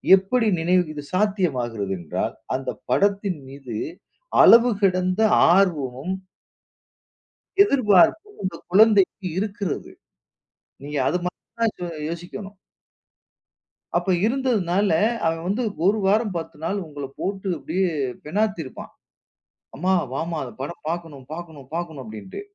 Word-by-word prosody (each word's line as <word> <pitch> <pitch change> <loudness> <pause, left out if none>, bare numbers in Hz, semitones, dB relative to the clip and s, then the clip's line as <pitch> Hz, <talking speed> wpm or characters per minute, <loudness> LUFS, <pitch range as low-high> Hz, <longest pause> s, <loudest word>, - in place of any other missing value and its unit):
எப்படி 220 +5 +1
நினைவு 180 +2 +3
இது 145 - -6
சாத்தியமாகிறது 130 - 0
என்றால், 80 -3 -3 0.2
அந்தப் 135 0 -4
படத்தின் 200 -4 +1
மீது 135 -4 -8 0.7
அளவு 235 +1 +8
கடந்த 185 +1 +2 0.3
ஆர்வமும் 160 -4 +1 1.5
எதிர்பார்ப்பும் 280 - +3
அந்தக் 185 - -5
குழந்தைக்கு 205 -1 +4
இருக்கிறது. 200 -3 -3 0.9
நீங்க 145 0 -4
அது 180 - +2
மாரி 180 - -4 0.2
தான் 225 -2 +2
சொ 180 - -3 0.2
யோசிக்கணும். 185 +4 -7 1.4
அப்ப, 190 - +1 0.2
இருந்ததுனால 210 -7 +1 0.4
அவன் 165 +1 -1
வந்து 210 +7 0 0.2
1 210 +3 +4
வாரம் 210 -1 +2
10 165 - -5
நாள் 190 +5 -1
உங்களப் 145 -2 -8
போட்டு 195 0 -3
அப்படியே 185 +5 -1 0.4
பினாத்திருப்பான். 190 -4 -2 0.8
"அம்மா, 185 +7 +1 0.2
வாம்மா, 165 +4 -2
அந்த 125 - -8
படம் 160 +5 -6
பாக்கணும் 165 -6 -5
பாக்கணும் 160 -6 -9
பாக்கணும்," 160 -5 -4
அப்படின்னுட்டு. 110 - -8
180 Hz, 110 wpm, -23 LUFS, 150-205 Hz, 1.5 s, அளவு